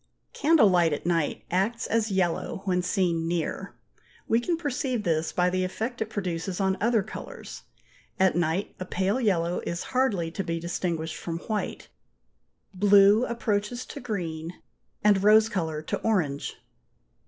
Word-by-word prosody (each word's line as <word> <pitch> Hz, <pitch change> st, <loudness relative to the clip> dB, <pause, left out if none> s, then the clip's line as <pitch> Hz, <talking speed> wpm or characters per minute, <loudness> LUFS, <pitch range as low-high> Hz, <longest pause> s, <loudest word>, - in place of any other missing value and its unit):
Candle 300 Hz, -6 st, +5 dB
light 175 Hz, -4 st, +3 dB
at 145 Hz, -, -4 dB
night 170 Hz, -3 st, 0 dB
acts 200 Hz, +6 st, 0 dB
as 225 Hz, -1 st, +1 dB
yellow 190 Hz, 0 st, -1 dB
when 180 Hz, -2 st, +1 dB
seen 175 Hz, -3 st, 0 dB
near; 170 Hz, -1 st, -3 dB, 0.5 s
we 225 Hz, -, +3 dB
can 335 Hz, +7 st, -1 dB
perceive 260 Hz, -6 st, -2 dB
this 160 Hz, -3 st, 0 dB
by 180 Hz, 0 st, +2 dB
the 185 Hz, 0 st, 0 dB
effect 225 Hz, +6 st, -4 dB
it 220 Hz, -, -1 dB
produces 180 Hz, -3 st, -3 dB
on 190 Hz, -1 st, +2 dB
other 225 Hz, -1 st, +3 dB
colours. 215 Hz, -, -9 dB, 0.6 s
At 190 Hz, 0 st, +4 dB
night 175 Hz, +3 st, 0 dB
a 185 Hz, -, -4 dB
pale 190 Hz, +7 st, 0 dB
yellow 175 Hz, -5 st, +1 dB
is 170 Hz, 0 st, -3 dB
hardly 205 Hz, -11 st, +1 dB
to 195 Hz, -, -3 dB
be 165 Hz, -1 st, -2 dB
distinguished 170 Hz, -1 st, -3 dB
from 165 Hz, -1 st, -4 dB
white; 215 Hz, -2 st, -3 dB, 0.9 s
blue 205 Hz, +4 st, +5 dB
approaches 235 Hz, +1 st, -2 dB
to -, -, -8 dB
green, 170 Hz, -7 st, -4 dB, 0.5 s
and 205 Hz, -2 st, +4 dB
rose 215 Hz, +1 st, +6 dB
colour 160 Hz, -7 st, -2 dB
to -, -, -2 dB
orange. 165 Hz, -11 st, -1 dB
190 Hz, 150 wpm, -27 LUFS, 170-220 Hz, 0.9 s, rose